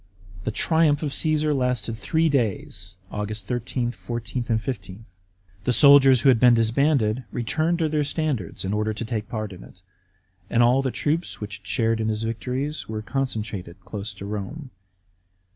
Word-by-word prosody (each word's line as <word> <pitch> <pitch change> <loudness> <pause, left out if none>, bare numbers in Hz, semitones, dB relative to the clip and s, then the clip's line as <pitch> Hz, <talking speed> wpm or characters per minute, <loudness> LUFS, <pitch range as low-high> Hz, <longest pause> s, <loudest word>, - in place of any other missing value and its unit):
The - - +1
triumph 160 +3 +2
of 145 -2 -2
Caesar 155 0 +2
lasted 125 -4 -1
three 160 +8 +1
days 120 - -1 0.2
(Aug. 105 +1 -3
13, 120 +1 -2
14, 120 +1 -5 0.2
15). 110 -4 -6 0.6
The 125 - +1
soldiers 135 0 +7
who 135 - +5
had 125 -3 +5
been 125 0 +6
disbanded 115 0 +2
returned 155 +8 0
to 165 -2 +1
their 150 -1 +1
standards 145 - -2
in 95 - -1
order 105 +1 -1
to 115 - -4
take 110 -2 -3
part 110 -3 -4
in 90 - -11
it, 90 - -17 0.7
and 120 0 +3
all 125 +3 +4
the 135 - -1
troops 155 +6 -2
which 105 0 -6
had 105 - -18
shared 115 -1 +1
in 110 - 0
his 110 0 -2
victories 125 +6 -3
were 110 -1 -4
concentrated 105 -9 -3
close 100 +3 -5
to 100 - -9
Borne. 105 +8 -6
120 Hz, 165 wpm, -24 LUFS, 110-140 Hz, 0.7 s, soldiers